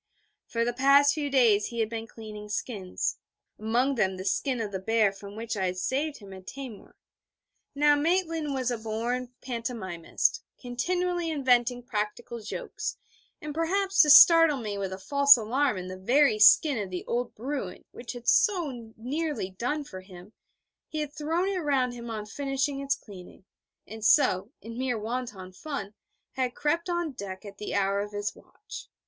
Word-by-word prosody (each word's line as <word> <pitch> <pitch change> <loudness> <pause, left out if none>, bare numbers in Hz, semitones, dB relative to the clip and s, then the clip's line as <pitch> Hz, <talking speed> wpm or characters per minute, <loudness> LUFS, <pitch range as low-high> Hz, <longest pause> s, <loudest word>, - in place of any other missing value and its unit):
For 230 0 -1
the 240 - -1
past 280 +3 +5
few 295 -2 -2
days 230 -7 +4
he 235 - -6
had 220 - +2
been 225 0 -6
cleaning 215 -2 -10
skins, 205 -3 -3 0.4
among 240 +6 +1
them 190 -6 0
the 185 - -6
skin 250 +6 0
of 215 -3 -3
the 190 - -3
bear 220 +1 +2
from 200 +1 -11
which 225 +1 -4
I 190 -2 0
had 180 0 -3
saved 285 +9 -1
him 200 -2 -12
at 190 -1 -12
Taimur. 260 -6 -9 0.8
Now, 295 +1 +5
Maitland 325 -2 0
was 255 -2 -1
a 240 - -3
born 235 +3 -3
pantomimist, 230 -9 -2 0.2
continually 350 +7 -1
inventing 250 -4 +2
practical 225 +1 -4
jokes; 215 - -5 0.5
and 300 -1 -5
perhaps 385 +5 +2
to 300 - +4
startle 330 0 +8
me 215 -5 -4
with 195 -1 -3
a 190 - -5
false 280 +6 +6
alarm 245 +2 0
in 180 0 -5
the 185 0 -7
very 245 +3 +3
skin 265 +4 +6
of 200 -2 -4
the 180 -1 -5
old 240 +1 -2
Bruin 250 -6 -5
which 240 +1 -8
had 240 -1 -10
so 355 -9 +3 0.3
nearly 255 - -3
done 250 +10 -2
for 190 -9 -9
him, 185 +2 -14 0.5
he 310 - -4
had 295 -1 -5
thrown 320 +5 -1
it 390 -2 -1
round 270 -6 +1
him 235 -1 -8
on 215 -2 -4
finishing 275 +3 -2
its 275 0 0
cleaning, 185 -2 -13 0.4
and 220 +1 -9
so, 210 -6 +4
in 230 +2 -8
mere 255 -2 -1
wanton 215 -4 -5
fun, 215 -4 -6 0.4
had 255 -2 -2
crept 335 +4 0
on 345 -2 -1
deck 200 -5 -8
at 200 0 -11
the 210 - -4
hour 200 0 +1
of 205 +1 -4
his 205 0 -3
watch. - - -11
240 Hz, 175 wpm, -27 LUFS, 210-285 Hz, 0.8 s, startle